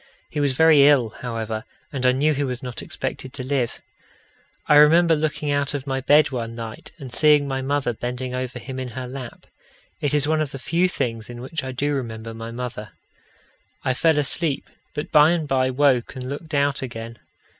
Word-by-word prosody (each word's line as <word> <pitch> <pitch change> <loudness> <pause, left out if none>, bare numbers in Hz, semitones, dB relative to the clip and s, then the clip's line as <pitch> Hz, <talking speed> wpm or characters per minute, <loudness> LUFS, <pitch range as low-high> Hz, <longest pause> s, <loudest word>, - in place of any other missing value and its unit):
He 150 - -3
was 140 -2 +2
very 150 -1 +6
ill, 135 -6 +4
however, 115 -2 -4 0.3
and 130 -2 +1
I - - +6
knew 145 +4 +2
he 145 0 -1
was 125 -2 -4
not 125 -2 -5
expected 130 0 -5
to 130 - -4
live. 130 -3 -2 0.8
I - - +4
remember 165 +3 +6
looking 150 -1 -1
out 145 0 0
of 140 -1 -4
my 135 -1 -2
bed 145 +2 +5
one 115 -3 -4
night 115 -1 -7
and 135 -6 -9
seeing 150 -1 +5
my 135 -1 -2
mother 135 -2 0
bending 125 +2 -4
over 125 -1 -3
him 130 +2 -6
in 130 - -4
her 130 -1 -4
lap; 125 -2 -8 0.5
it 145 0 0
is 145 0 +3
one 155 0 +2
of 150 -2 -3
the - - -4
few 170 +7 +1
things 115 -9 -3
in 120 0 -8
which 135 +4 -4
I 130 - -4
do 145 +3 -1
remember 115 -4 -4
my 115 0 -7
mother. 115 -3 -6 0.9
I 130 - +1
fell 160 +4 +3
asleep, 150 +1 0 0.3
but 150 - -4
by 150 +2 +6
and 160 -3 -2
by 130 -1 +2
woke 130 -1 +2
and 130 -1 -6
looked 145 +3 -5
out 140 0 +1
again. 115 -3 -7
135 Hz, 200 wpm, -23 LUFS, 125-145 Hz, 0.9 s, very